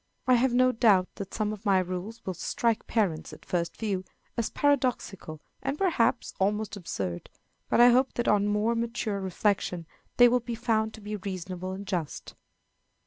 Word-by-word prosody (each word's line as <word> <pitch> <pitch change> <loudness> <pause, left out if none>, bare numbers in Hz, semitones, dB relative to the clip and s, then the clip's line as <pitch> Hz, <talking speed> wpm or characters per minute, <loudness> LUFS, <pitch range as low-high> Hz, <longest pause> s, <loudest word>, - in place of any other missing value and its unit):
I 255 - +4
have 250 +1 +3
no 255 +1 +4
doubt 210 -6 +4
that 195 -1 -6
some 215 -1 -1
of 210 0 -9
my 200 -3 +4
rules 185 +5 -4
will 185 - -2
strike 225 +6 -1
parents, 190 -9 0
at - - -13
first 170 -1 -2
view, 200 -4 -2 0.3
as 235 -2 -1
paradoxical 250 - 0 0.2
and, 275 - -2
perhaps, 315 -11 +1
almost 210 +3 0
absurd; 95 - -4 0.4
but - - +2
I 240 +1 +9
hope 255 +2 +3
that 240 - -1
on 205 -1 +3
more 210 +3 +1
mature 230 -3 -2
reflection 190 -2 -1 0.3
they 245 - +9
will 250 +1 +3
be 240 0 -5
found 220 -1 0
to 220 - -13
be 210 +1 -4
reasonable 185 -1 -5
and 195 +1 -7
just. 175 -6 -4
210 Hz, 175 wpm, -28 LUFS, 185-235 Hz, 0.4 s, I